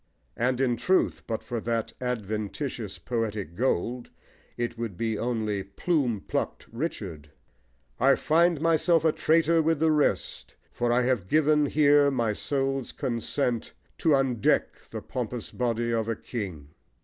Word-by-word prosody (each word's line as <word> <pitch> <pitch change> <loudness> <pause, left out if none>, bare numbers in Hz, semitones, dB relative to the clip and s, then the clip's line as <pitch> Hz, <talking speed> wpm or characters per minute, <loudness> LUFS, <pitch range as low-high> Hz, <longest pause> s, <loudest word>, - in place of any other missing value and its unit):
And 125 +1 0
in 125 -3 +2
truth, 185 +8 +1
but 110 - -3
for 120 -2 -3
that 115 -1 -2
adventitious 110 -1 -3
poetic 110 -7 -3
gold, 120 +1 -1 0.5
it 120 0 -2
would 115 -6 -5
be 115 +1 -1
only 110 -4 -1
"plume 120 - -1
plucked - - -3
Richard." 100 - -5 0.7
I 135 +2 +5
find 165 +2 +3
myself 165 +1 +3
a 160 - +5
traitor 165 +1 +3
with 160 -1 +1
the 160 0 +3
rest, 150 -2 0 0.2
For 120 0 0
I 125 +1 +3
have 120 -7 0
given 150 +2 +3
here 145 -1 +5
my 120 -5 0
soul's 135 +1 -2
consent 120 0 -2 0.3
To 155 -3 +4
undeck 130 -5 0
the - - -6
pompous - - -4
body 120 -1 -1
of 115 -1 0
a 115 - -1
king. 90 - -6
120 Hz, 140 wpm, -27 LUFS, 110-145 Hz, 0.7 s, I